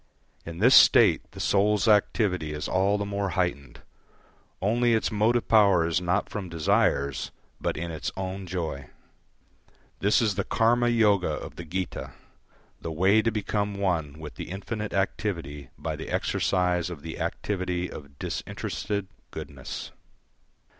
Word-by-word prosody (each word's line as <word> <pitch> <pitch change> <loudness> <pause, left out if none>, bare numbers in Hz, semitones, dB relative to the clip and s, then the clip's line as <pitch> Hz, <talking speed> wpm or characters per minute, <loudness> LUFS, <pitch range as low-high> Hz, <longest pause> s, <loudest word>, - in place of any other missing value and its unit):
In 85 0 -6
this 120 +8 +5
state - - +7
the - - -12
soul's 105 +2 +2
activity 100 -6 +2
is 75 - -4
all 95 +2 +2
the 100 - -2
more 100 -1 -2
heightened, 70 -9 -2 0.8
only 115 +4 +2
its 110 - 0
motive 110 +3 +2
power 100 -6 +5
is 85 +1 0
not 90 +1 0
from 100 -4 -5
desires, 70 -4 +1 0.3
but - - -2
in 85 +1 -4
its 80 - -4
own 95 0 -4
joy. 80 -7 -4 1.1
This 100 +2 +3
is 110 -3 +2
the 100 +1 -1
Karma 120 +3 +2
yoga 105 -5 +3
of - - -6
the 85 - -8
Gita, 90 +3 -4 0.7
the 80 - -4
way 95 +7 +4
to 115 - +1
become 105 -1 -2
one 85 -7 -1
with 75 -2 -8
the - - -6
infinite 105 +3 -5
activity 85 -8 -2
by - - -4
the - - -7
exercise 90 -1 0
of 80 -5 -8
the 80 0 -7
activity 90 -3 -2
of 70 -4 -11
disinterested 100 +7 -4 0.2
goodness. - - -7
95 Hz, 145 wpm, -26 LUFS, 85-105 Hz, 1.1 s, state